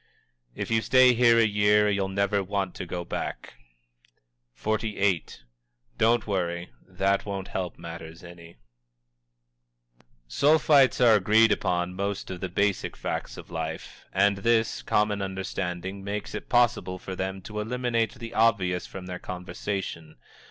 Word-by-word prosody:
"If - - -4
you 115 0 +3
stay 130 +1 +5
here 120 -1 +5
a 115 - +5
year 105 0 +3
you'll 100 -2 +1
never 100 +1 0
want 95 -1 -2
to 90 - -7
go 85 0 -4
back." - - -5 1.0
XLVIII. 105 - 0 0.7
"Don't 115 0 +3
worry; 85 - -2 0.2
that 95 +1 0
won't 100 -2 -5
help 90 -2 -4
matters 85 0 -9
any." 85 -3 -13 1.7
Sulphites 145 - +4
are 120 -3 +6
agreed 110 +2 +5
upon 90 0 0
most 100 +1 -3
of 90 - -6
the 95 - -4
basic 100 +2 -1
facts - - -4
of - - -11
life, 80 -1 -6
and 100 +1 +3
this 115 +2 +1
common 105 -1 +1
understanding 95 0 -4
makes 100 +1 -4
it - - -6
possible 120 -7 +2
for 95 +1 -7
them 95 +1 -3
to 105 +2 -6
eliminate 115 0 -1
the 115 -1 -8
obvious 95 -6 +2
from 95 -1 -9
their 90 0 -6
conversation. 90 -2 -5
100 Hz, 140 wpm, -26 LUFS, 90-110 Hz, 1.7 s, are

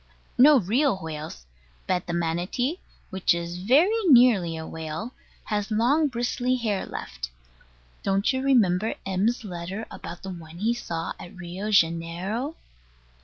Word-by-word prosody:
No 280 +2 +7
real 235 +4 +2
whales: 155 - -7 0.4
but 180 -1 -1
the 170 - -3
Manati, 175 - -1 0.3
which 190 -2 +2
is 170 +1 -4
very 280 - +4
nearly 235 - +5
a 160 - -6
whale, 160 +10 -6 0.3
has 210 0 -2
long 250 +8 +3
bristly 245 0 0
hair 215 -6 -1
left. - - -6 0.7
Don't 195 +5 +1
you 260 - -1
remember 220 -6 +3
M.'s 200 +6 0
letter 185 +2 -5
about 175 - -8
the 190 - -5
one 165 -2 -10
he 220 +5 +1
saw 170 -9 -4
at 175 - -10
Rio 180 +4 -5
Janeiro? 185 - +1
195 Hz, 135 wpm, -26 LUFS, 170-245 Hz, 0.7 s, No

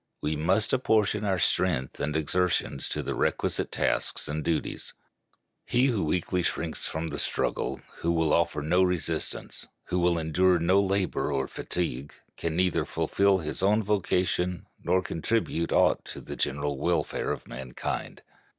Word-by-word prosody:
We 75 +1 -1
must 95 +8 +2
apportion 110 -4 +2
our 95 -2 +1
strength 85 -6 +1
and 75 +1 -1
exertions 90 +3 0
to - - -2
the - - -2
requisite - - 0
tasks - - 0
and 75 0 -3
duties. 80 +1 -2 0.7
He 125 +2 +2
who 120 -7 +1
weakly 90 +3 0
shrinks 85 -1 -1
from 80 +1 -3
the - - -3
struggle, - - -1 0.2
who 85 - +1
will 80 -2 +2
offer 85 -3 +1
no 90 +5 +3
resistance, 85 -3 -1 0.2
who 90 - +1
will 85 -1 +3
endure 90 +3 +3
no 90 +4 +3
labor 100 -4 0
nor 70 -2 0
fatigue, 70 -6 -4 0.2
can 80 -1 -3
neither 90 0 +2
fulfill 100 -1 +2
his 80 -1 -3
own 105 +3 +3
vocation, 90 -3 0 0.2
nor 95 0 +2
contribute 85 -1 -1
aught - - +3
to - - -7
the - - -7
general 70 0 -1
welfare - - 0
of - - -5
mankind. 65 0 -5
85 Hz, 150 wpm, -28 LUFS, 80-95 Hz, 0.7 s, no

